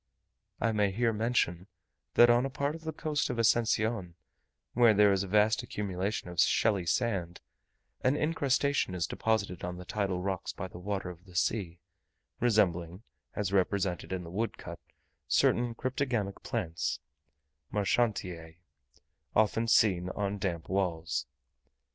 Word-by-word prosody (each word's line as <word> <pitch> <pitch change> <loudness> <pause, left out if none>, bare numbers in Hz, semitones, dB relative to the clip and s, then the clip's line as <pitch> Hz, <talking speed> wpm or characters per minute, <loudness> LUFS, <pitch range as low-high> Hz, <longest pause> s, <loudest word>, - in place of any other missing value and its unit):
I 115 - +1
may 105 -2 +2
here 115 +4 +1
mention, 105 -5 0 0.5
that 120 - +8
on 120 +1 +4
a 135 - -1
part 140 +2 -2
of 160 0 -10
the 160 - -2
coast 155 -2 -1
of 125 - -3
Ascension, 110 -5 +1 0.6
where 120 -2 +5
there 105 0 +6
is 95 -1 +2
a 100 - -3
vast 105 +2 +3
accumulation 100 0 -3
of 90 -1 -6
shelly 100 -6 +3
sand, 90 -5 -1 0.6
an 130 +2 +3
incrustation 140 - +1
is 85 -3 0
deposited 100 -2 -1
on 90 0 -4
the 90 - -9
tidal 100 -2 -1
rocks 95 0 -3
by 95 - -5
the 90 - -11
water 95 -1 -3
of 90 +1 -15
the 90 -2 -16
sea, 90 -3 -1 0.6
resembling, 95 -5 +1 0.3
as 100 -2 -2
represented 95 -1 0
in 95 -1 -3
the 85 - -9
woodcut, 110 +5 -4 0.5
certain 120 -1 +2
cryptogamic 125 -6 -2
plants 80 -2 -2 0.7
(Marchantiae) 95 -6 -1 0.8
often 110 +2 +2
seen 90 -5 +3
on 100 +1 -2
damp 85 -4 -3
walls. 90 -5 -1
100 Hz, 140 wpm, -30 LUFS, 90-115 Hz, 0.8 s, that